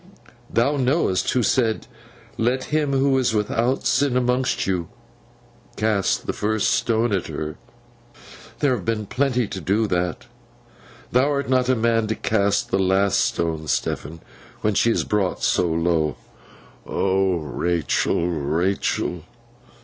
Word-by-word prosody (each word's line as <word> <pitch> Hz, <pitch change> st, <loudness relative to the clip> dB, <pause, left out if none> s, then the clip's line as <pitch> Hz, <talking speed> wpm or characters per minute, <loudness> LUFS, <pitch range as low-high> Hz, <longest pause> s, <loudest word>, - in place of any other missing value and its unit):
Thou 140 Hz, +6 st, +2 dB
knowest 130 Hz, -, +1 dB
who 125 Hz, -, +1 dB
said, 115 Hz, -2 st, +1 dB, 0.5 s
"Let 125 Hz, +3 st, 0 dB
him 150 Hz, -2 st, +1 dB
who 135 Hz, 0 st, +2 dB
is 120 Hz, -3 st, +1 dB
without 115 Hz, +5 st, 0 dB
sin 140 Hz, -3 st, +2 dB
among 125 Hz, +1 st, +1 dB, 0.2 s
you 90 Hz, -3 st, -2 dB, 0.9 s
cast 105 Hz, -3 st, 0 dB
the -, -, -2 dB
first 110 Hz, 0 st, 0 dB
stone 115 Hz, -1 st, +1 dB
at 95 Hz, -, -1 dB
her!" 75 Hz, 0 st, -5 dB, 1.1 s
There 145 Hz, -, +3 dB
have 105 Hz, -, -6 dB
been 110 Hz, 0 st, -1 dB
plenty 125 Hz, 0 st, 0 dB
to 95 Hz, -2 st, -5 dB
do 100 Hz, +7 st, +1 dB
that. 90 Hz, -3 st, -2 dB, 0.9 s
Thou 130 Hz, +4 st, +3 dB
art 140 Hz, -2 st, -1 dB
not 130 Hz, -1 st, +3 dB
the 130 Hz, -, +3 dB
man 115 Hz, -1 st, +1 dB
to 110 Hz, -, -1 dB
cast 100 Hz, -2 st, 0 dB
the 95 Hz, -, +2 dB
last 95 Hz, +1 st, +2 dB
stone, 80 Hz, -2 st, -1 dB
Stephen, 80 Hz, +2 st, -2 dB, 0.4 s
when 105 Hz, -, +1 dB
she 115 Hz, -, +3 dB
is 115 Hz, -, +1 dB
brought 100 Hz, -4 st, -1 dB
so 90 Hz, -, +2 dB
low.' 80 Hz, -3 st, 0 dB, 0.7 s
'O 95 Hz, -1 st, +1 dB
Rachael, 85 Hz, +3 st, 0 dB
Rachael! 85 Hz, +2 st, -1 dB
105 Hz, 135 wpm, -22 LUFS, 90-125 Hz, 1.1 s, There